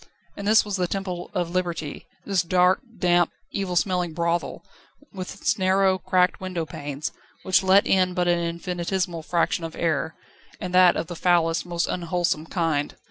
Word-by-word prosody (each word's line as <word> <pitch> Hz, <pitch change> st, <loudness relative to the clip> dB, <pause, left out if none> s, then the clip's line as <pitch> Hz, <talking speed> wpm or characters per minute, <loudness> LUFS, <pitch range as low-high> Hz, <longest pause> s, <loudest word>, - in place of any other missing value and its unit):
And 200 Hz, -, -5 dB
this 220 Hz, +1 st, +5 dB
was 205 Hz, -1 st, -2 dB
the 180 Hz, -1 st, 0 dB
temple 185 Hz, -2 st, -4 dB
of 175 Hz, -2 st, -1 dB
Liberty, 175 Hz, -4 st, -3 dB, 0.2 s
this 195 Hz, -3 st, +2 dB
dark, 180 Hz, +1 st, +3 dB, 0.2 s
damp, 175 Hz, -1 st, +3 dB, 0.2 s
evil 195 Hz, -3 st, -2 dB
smelling 175 Hz, 0 st, 0 dB
brothel, 170 Hz, +1 st, -2 dB, 0.5 s
with 190 Hz, 0 st, -7 dB
is 220 Hz, -, +1 dB
narrow, 190 Hz, 0 st, +3 dB
cracked 180 Hz, 0 st, +1 dB
window 185 Hz, -3 st, -3 dB
panes, 145 Hz, -1 st, -5 dB, 0.3 s
which 185 Hz, -, +3 dB
let 190 Hz, +1 st, +5 dB
in 185 Hz, -1 st, +2 dB
but 180 Hz, -1 st, +1 dB
an 175 Hz, 0 st, +3 dB
infinitesimal 170 Hz, +1 st, -2 dB
fraction 170 Hz, +1 st, 0 dB
of 165 Hz, -1 st, -6 dB
air, 160 Hz, -1 st, -1 dB, 0.4 s
and 180 Hz, -1 st, -5 dB
that 180 Hz, -1 st, +6 dB
of -, -, -2 dB
the 175 Hz, -, -7 dB
foulest, 170 Hz, -1 st, +2 dB
most 170 Hz, -1 st, 0 dB
unwholesome 175 Hz, -2 st, -1 dB
kind. 160 Hz, -5 st, -1 dB
175 Hz, 165 wpm, -24 LUFS, 170-185 Hz, 0.5 s, that